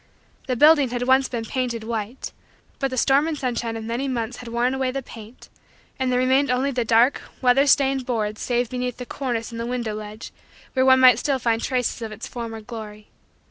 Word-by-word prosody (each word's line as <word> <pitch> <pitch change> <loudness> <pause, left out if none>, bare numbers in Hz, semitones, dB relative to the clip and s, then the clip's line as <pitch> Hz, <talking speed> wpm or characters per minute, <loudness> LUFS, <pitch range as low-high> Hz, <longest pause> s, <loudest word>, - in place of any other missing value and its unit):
The 255 - 0
building 295 0 +5
had 245 0 -2
once 260 +1 +3
been 235 -2 -4
painted 240 -2 -3
white 225 +2 -5 0.5
but 270 - 0
the 255 - -5
storm 275 +5 +3
and 320 -2 -2
sunshine 235 -3 -2
of 225 - -6
many 235 +5 -3
months 240 -2 -3
had 245 - -10
worn 240 +2 0
away 265 -1 -1
the 270 +1 -4
paint, 225 0 -12 0.5
and 260 -1 0
there 250 - +2
remained 260 +2 +2
only 255 +3 +1
the 250 -2 -1
dark, 230 +4 +3 0.2
weather 265 +2 +4
stained, 270 -1 +3
boards 220 -4 -2
save 245 0 0
beneath 250 -1 -3
the 250 - -6
cornice 240 -4 -3
and 230 - -7
the 230 - -3
window 240 -3 -3
ledge 215 +1 -8 0.4
where 260 -1 +2
one 260 0 +6
might 255 -1 +7
still 280 -2 0
find 230 -2 0
traces 250 -2 -1
of 225 -1 -5
its 215 +1 -7
former 230 -2 -6
glory. 215 -2 -9
245 Hz, 210 wpm, -23 LUFS, 230-260 Hz, 0.5 s, might